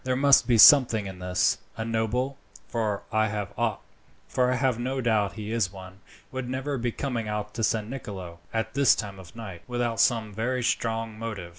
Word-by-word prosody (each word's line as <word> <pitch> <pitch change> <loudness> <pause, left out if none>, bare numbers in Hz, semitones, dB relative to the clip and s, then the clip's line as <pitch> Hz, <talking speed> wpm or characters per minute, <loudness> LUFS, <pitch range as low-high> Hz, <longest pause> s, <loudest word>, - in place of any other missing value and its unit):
There 130 0 0
must 140 +1 +5
be 120 -2 +4
something 115 -4 +7
in 95 -1 -8
this. 90 0 +1 0.2
A 110 - -3
noble 115 +4 -1 0.3
for 110 -4 -2
I 110 0 +2
have 120 +4 -2
no 130 +2 -2
doubt 110 -5 +1
he 110 -1 -6
is 110 -5 0
one 95 -1 -11 0.3
would 130 -1 -4
never 135 +1 -2
be 120 0 -1
coming 120 -4 -3
out 105 0 -4
to 115 - -3
San 110 0 0
Nicolo, 95 -9 -7
at 110 0 -2
this 140 -3 +5
time 100 -2 -6
of 90 0 -13
night, 100 -7 -8
without 120 -2 -2
some 110 -4 +2
very 125 +4 -1
strong 115 -2 -1
motive. 105 -6 -5
115 Hz, 175 wpm, -26 LUFS, 105-125 Hz, 0.3 s, something